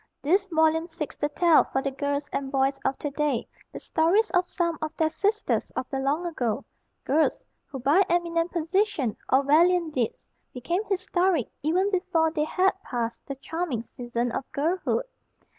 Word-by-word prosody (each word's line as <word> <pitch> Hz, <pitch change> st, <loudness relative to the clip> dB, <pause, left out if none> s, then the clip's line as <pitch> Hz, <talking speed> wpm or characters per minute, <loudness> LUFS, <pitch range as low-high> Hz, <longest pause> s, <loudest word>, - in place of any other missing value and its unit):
This 385 Hz, +7 st, +2 dB
volume 320 Hz, -1 st, +2 dB
seeks 320 Hz, -3 st, -6 dB
to 295 Hz, -, -1 dB
tell 335 Hz, +1 st, +5 dB
for 265 Hz, -, -1 dB
the 275 Hz, -, -1 dB
girls 285 Hz, +1 st, -2 dB
and 270 Hz, -1 st, -2 dB
boys 270 Hz, 0 st, +1 dB
of 270 Hz, -, 0 dB
to 290 Hz, -, -4 dB
day 290 Hz, -4 st, -1 dB, 0.2 s
the -, -, -7 dB
stories 365 Hz, +7 st, +2 dB
of 360 Hz, 0 st, +2 dB
some 340 Hz, -3 st, -1 dB
of 310 Hz, 0 st, -2 dB
their 315 Hz, -1 st, +2 dB
sisters 415 Hz, +5 st, 0 dB
of -, -, -3 dB
the 270 Hz, -, -1 dB
long 285 Hz, +6 st, 0 dB
ago, 245 Hz, -10 st, -2 dB, 0.4 s
girls 310 Hz, +3 st, +1 dB, 0.2 s
who 270 Hz, -, -7 dB
by 280 Hz, +9 st, +4 dB
eminent 340 Hz, -1 st, +1 dB
position 340 Hz, -, 0 dB, 0.2 s
or 265 Hz, +2 st, +5 dB
valiant 335 Hz, +3 st, +3 dB
deeds 240 Hz, -5 st, -2 dB, 0.3 s
became 340 Hz, -, -1 dB
historic 370 Hz, -, 0 dB
even 365 Hz, +7 st, +1 dB
before 355 Hz, -4 st, +1 dB
they 305 Hz, -2 st, 0 dB
had 375 Hz, +4 st, +2 dB
passed 235 Hz, -5 st, -4 dB
the 275 Hz, -, -4 dB
charming 275 Hz, -3 st, -3 dB
season 240 Hz, 0 st, -3 dB
of 270 Hz, -, -5 dB
girlhood. 355 Hz, -, 0 dB
315 Hz, 170 wpm, -26 LUFS, 275-355 Hz, 0.4 s, tell